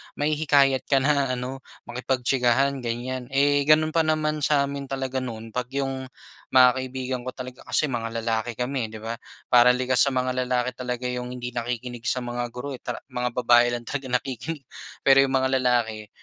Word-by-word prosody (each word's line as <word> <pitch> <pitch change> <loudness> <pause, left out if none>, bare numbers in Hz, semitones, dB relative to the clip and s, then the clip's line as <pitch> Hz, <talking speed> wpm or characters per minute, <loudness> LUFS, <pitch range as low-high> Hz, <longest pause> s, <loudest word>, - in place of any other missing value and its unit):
mahihikayat 145 -3 +2
ka 135 -2 +3
na 140 -3 +2
ano, 130 +2 -5 0.2
makipagtsikahan, 130 +2 +1
ganyan. 125 +1 -4
Eh, 140 +1 +2
gano'n 155 +1 +5
pa 160 -1 +2
naman 155 -1 +1
sa 145 -1 +3
amin 140 -1 -4
talaga 135 -1 -2
noon, 115 -3 -6
'pag 125 +1 -3
'yung 135 -1 -2 0.5
mga 125 -1 +9
kaibigan 130 0 -4
ko 130 - -5
talaga, 130 0 -8
kasi 150 -3 +1
mga 115 -1 -3
lalaki 115 0 -1
kami, 125 -1 -2
eh, - - -14
'di - - -7
ba? 115 +1 -4 0.3
Parang 125 0 +7
likas 130 0 +1
sa 140 -2 +3
mga 130 0 +1 0.2
lalaki 125 0 0
talaga 125 0 -5
'yung 125 0 -4
hindi 125 0 -5
nakikinig 120 0 -4
sa 130 -1 0
mga 120 0 -3
guro 140 +3 -5
eh, 130 - -6
tara - - -6
mga 125 -1 -2
babae 120 -1 +5
lang 120 - -6
talaga 135 +1 -4
nakikinig. 135 +4 -3 0.4
Pero 135 0 +6
'yung 135 -1 +3
mga 130 0 +2
lalaki, 115 -4 0
130 Hz, 185 wpm, -25 LUFS, 120-135 Hz, 0.5 s, mga